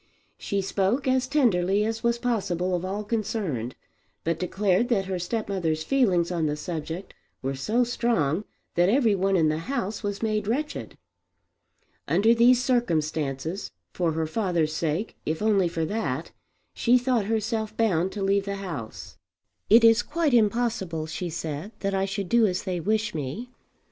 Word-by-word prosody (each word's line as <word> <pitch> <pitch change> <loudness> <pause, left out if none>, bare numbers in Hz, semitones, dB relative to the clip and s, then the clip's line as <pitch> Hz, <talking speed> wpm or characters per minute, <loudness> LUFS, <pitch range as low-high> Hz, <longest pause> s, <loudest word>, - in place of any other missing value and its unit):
She 200 -1 -1
spoke 200 +8 0
as 260 -1 +2
tenderly 210 -8 +2
as 225 0 -2
was 235 0 +1
possible 185 -7 -1
of 175 - -3
all 195 +3 -3
concerned, 200 - -2 0.5
but 165 0 -1
declared 190 +4 +1
that 200 -6 +2
her 185 -1 -3
stepmother's 175 -5 -1
feelings 185 -9 +2
on 165 -3 0
the 150 - -1
subject 165 +3 -5 0.3
were 135 +1 -1
so 215 - +1
strong 220 - 0 0.3
that 175 +2 +3
every 230 -2 +4
one 195 0 +1
in 160 -2 +3
the 155 +1 -1
house 210 0 -3
was 205 0 -3
made 215 -2 0
wretched. 290 +7 -3 1.1
Under 225 +3 +4
these 240 +2 +5
circumstances, 160 - -1 0.2
for 170 -3 0
her 160 0 -1
father's 170 -3 0
sake 165 +6 -2
if 155 +1 -2
only 205 -4 +3
for 165 -1 -2
that, 160 -7 -3 0.4
she 245 +1 +4
thought 245 -4 +1
herself 220 0 -2
bound 190 -5 +2
to 205 - -3
leave 195 0 +2
the 200 0 -3
house. 165 - -7 0.5
"It 230 +2 +7
is 225 0 +6
quite 315 -3 0
impossible," 215 -7 +1
she 165 +3 -4
said, 160 +4 -5
"that 195 0 -1
I 195 0 +1
should 195 -1 -3
do 230 +2 +4
as 185 -1 -2
they 185 -3 -2
wish 210 +4 0
me. 160 - -5
195 Hz, 160 wpm, -26 LUFS, 170-225 Hz, 1.1 s, It